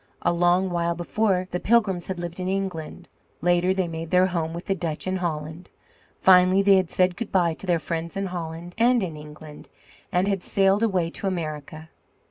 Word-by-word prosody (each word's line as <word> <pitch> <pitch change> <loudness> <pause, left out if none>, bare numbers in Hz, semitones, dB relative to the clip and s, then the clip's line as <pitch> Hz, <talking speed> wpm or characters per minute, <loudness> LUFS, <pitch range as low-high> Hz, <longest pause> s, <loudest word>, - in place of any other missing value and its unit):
A - - +2
long 175 +2 +2
while 170 0 0
before, 185 +1 0
the 180 - -2
Pilgrims 200 -6 +1
had 190 - -4
lived 175 0 -6
in 185 - -3
England; 190 -5 -4 0.3
later 175 +1 +2
they 190 -1 0
made 165 0 -6
their 180 +1 +4
home 170 -3 -2
with 170 +2 -7
the 195 - 0
Dutch 165 -4 -4
in 185 0 -1
Holland; 160 -1 -4 0.5
finally 185 +1 +5
they 195 -1 +6
had 185 -3 0
said 185 -1 +1
goodbye 185 -5 0
to 190 - -10
their 175 -2 +3
friends 165 +2 -4
in 195 - -1
Holland 170 -1 -6
and 240 -1 +4
in 165 -4 -4
England, 150 0 -12 0.4
and 180 +2 +1
had 195 -2 0
sailed 195 +2 +2
away 185 -7 +1
to 195 - -3
America. 155 -3 -5
180 Hz, 190 wpm, -24 LUFS, 165-190 Hz, 0.5 s, they